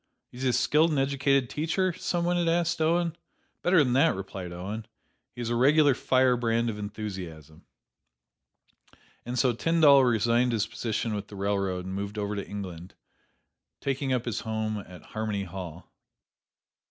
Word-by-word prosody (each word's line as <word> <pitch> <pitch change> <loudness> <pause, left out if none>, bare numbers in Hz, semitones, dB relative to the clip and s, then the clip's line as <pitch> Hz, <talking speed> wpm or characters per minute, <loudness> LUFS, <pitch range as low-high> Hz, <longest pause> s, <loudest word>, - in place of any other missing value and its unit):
"Is 125 - -10
he 130 - +2
a - - +1
skilled 155 +6 +3
and 150 - 0
educated 135 -1 +2
teacher?" 170 +7 0
some 170 +1 -2
one 175 0 +1
asked 170 -1 +1
Owen. 170 +1 +1 0.5
"Better 175 -3 +4
than 125 -3 0
that," 145 +1 +4
replied 95 -2 -6
Owen; 100 +5 -6 0.5
"he 120 - -6
is 120 0 -2
a - - +1
regular 145 +3 +5
firebrand 120 -3 +2
of 105 - -8
enthusiasm." 95 -8 -7 1.6
And 125 +1 -3
so 125 -1 +3
Tyndall 145 0 +5
resigned 120 +1 +2
his 110 -2 +1
position 110 0 -3
with 100 -1 -4
the 105 - -11
railroad 100 -2 -1
and 95 - -5
moved 100 +2 -4
over 105 0 -2
to 100 - -5
England, 95 -4 -7 0.8
taking 135 0 -2
up 125 -2 0
his 120 - -2
home 110 -1 -2
at 90 -2 -12
"Harmony 110 -2 -3
Hall." 90 -2 -8
115 Hz, 155 wpm, -27 LUFS, 100-140 Hz, 1.6 s, regular